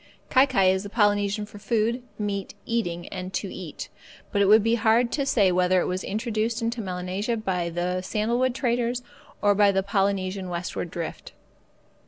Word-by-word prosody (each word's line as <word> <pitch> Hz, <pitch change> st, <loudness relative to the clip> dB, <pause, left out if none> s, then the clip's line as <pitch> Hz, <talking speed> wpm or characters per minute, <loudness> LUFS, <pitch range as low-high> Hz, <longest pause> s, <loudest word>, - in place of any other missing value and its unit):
Kai 265 Hz, +1 st, +6 dB
kai 195 Hz, -8 st, +4 dB
is 190 Hz, 0 st, 0 dB
the 200 Hz, -, -7 dB
Polynesian 205 Hz, -1 st, +1 dB
for 205 Hz, 0 st, -12 dB
food, 230 Hz, +3 st, 0 dB, 0.2 s
meat, 200 Hz, -2 st, -3 dB
eating, 175 Hz, -7 st, -2 dB
and 185 Hz, -1 st, -6 dB
to -, -, -3 dB
eat: -, -, -7 dB, 0.4 s
but 200 Hz, -, +1 dB
it 200 Hz, -, +4 dB
would 215 Hz, +1 st, +7 dB
be 225 Hz, +1 st, +2 dB
hard 235 Hz, +1 st, +3 dB
to 280 Hz, -2 st, -1 dB
say 200 Hz, -8 st, +4 dB
whether 180 Hz, +1 st, +3 dB
it -, -, 0 dB
was 185 Hz, +1 st, -2 dB
introduced 220 Hz, +1 st, -1 dB
into 230 Hz, 0 st, -2 dB
Melanesia 185 Hz, +4 st, -2 dB
by 180 Hz, -5 st, -1 dB
the 180 Hz, +2 st, -1 dB
sandalwood 235 Hz, +6 st, 0 dB
traders 245 Hz, -1 st, 0 dB, 0.4 s
or 205 Hz, 0 st, +5 dB
by 200 Hz, 0 st, +5 dB
the 195 Hz, 0 st, +1 dB
Polynesian 195 Hz, -1 st, 0 dB
westward 175 Hz, 0 st, -4 dB
drift. 165 Hz, -1 st, -6 dB
205 Hz, 175 wpm, -25 LUFS, 185-230 Hz, 0.4 s, would